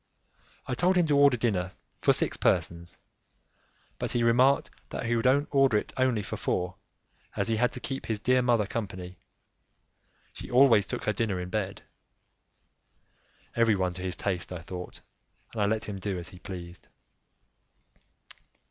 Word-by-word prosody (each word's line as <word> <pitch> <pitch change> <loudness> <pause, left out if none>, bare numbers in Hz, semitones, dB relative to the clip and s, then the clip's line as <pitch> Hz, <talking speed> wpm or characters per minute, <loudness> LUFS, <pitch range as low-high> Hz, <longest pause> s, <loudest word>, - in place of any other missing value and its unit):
I 130 - -3
told 180 +9 +2
him 175 -2 +4
to 150 -2 +2
order 140 -3 +5
dinner 100 -5 -1 0.3
for - - +4
six - - +1
persons, 85 +1 0 1.0
but - - -2
he 120 - +1
remarked 125 +4 +4 0.2
that - - -4
he 120 +1 +1
would 115 +2 +1 0.2
order 135 -5 +4
it - - -4
only 130 -5 +1
for - - -5
four, 90 0 -1 0.6
as - - 0
he 110 - +1
had 125 +2 +2
to - - -6
keep 135 +2 -5
his 110 -2 -1
dear 125 +4 +3
mother 120 -4 +2
company; 95 -4 -6 1.1
she - - -9
always 120 -5 +5
took - - -4
her 105 - 0
dinner 100 -3 -1
in 90 0 -5
bed. 100 -2 -3 1.7
Everyone 100 -6 +2
to 90 - -8
his 90 -1 -3
taste, 95 -3 -2
I 90 -2 -6
thought, 90 0 -8 0.5
and 110 - -2
I 100 - +3
let 110 +1 0
him 100 -2 -5
do 95 -1 -3
as 85 -1 -6
he 90 - -13
pleased. 90 -2 -9
105 Hz, 160 wpm, -28 LUFS, 90-125 Hz, 1.7 s, order